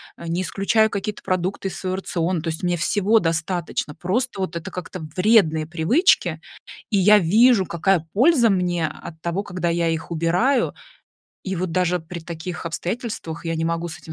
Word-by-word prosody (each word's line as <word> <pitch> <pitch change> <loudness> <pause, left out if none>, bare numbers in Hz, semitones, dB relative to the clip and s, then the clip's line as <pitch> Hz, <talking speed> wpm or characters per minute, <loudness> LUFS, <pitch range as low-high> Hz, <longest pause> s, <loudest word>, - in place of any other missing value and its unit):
а, 170 - -9
не 170 +3 -1
исключаю 215 +5 +2
какие-то 200 +1 -4
продукты 185 +1 -1
из - - -8
своего 185 -1 -2
рациона. 175 -2 -2
То 165 - -2
есть, 160 - -4
мне 175 -1 0
всего 205 +6 +2
достаточно. 170 -4 -1
Просто 200 +8 -2
вот 185 -3 -3
это 170 - -5
как-то- 180 0 -7 0.2
вредные 180 -6 +4
привычки. 175 - +2 0.5
И 210 - 0
я 210 +3 +7
вижу, 205 +3 +4
какая 170 -1 0
польза 250 +1 +5
мне 180 -4 +1
от 160 +1 -10
того, 170 +4 -2
когда 180 -3 -3
я 170 0 +1
их 160 +1 -4
убираю. 175 - +1 0.7
И 190 -1 -3
вот 175 -1 -2
даже 180 0 +1
при 170 +1 -8
таких 170 +2 -7
обстоятельствах 170 0 -4
я 165 0 -2
не 160 - -1
могу 170 +1 -1
с 160 0 -8
этим 160 -1 -10
180 Hz, 180 wpm, -22 LUFS, 165-200 Hz, 0.7 s, я